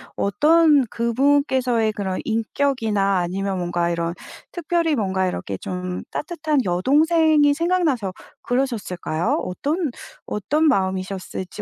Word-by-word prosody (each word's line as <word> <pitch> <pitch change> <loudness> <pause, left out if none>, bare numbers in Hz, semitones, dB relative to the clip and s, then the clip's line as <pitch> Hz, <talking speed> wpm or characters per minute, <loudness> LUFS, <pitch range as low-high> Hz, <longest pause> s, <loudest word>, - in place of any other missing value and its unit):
어떤 300 - +4
그분께서의 250 -1 +1
그런 190 -3 -3
인격이나 225 -4 0
아니면 190 +2 -2
뭔가 175 -1 -1
이런 170 0 -2 0.4
특별히 335 -2 0
뭔가 190 -4 0
이렇게 95 - -4
좀 180 - -5
따뜻한 310 -4 -1
여동생이 295 - +3
생각나서 310 - 0 0.3
그러셨을까요? 215 -10 -1
어떤 290 - -2 0.3
어떤 300 +10 0
마음이셨을지 190 -3 -2
230 Hz, 290 characters per minute, -22 LUFS, 185-295 Hz, 0.4 s, 어떤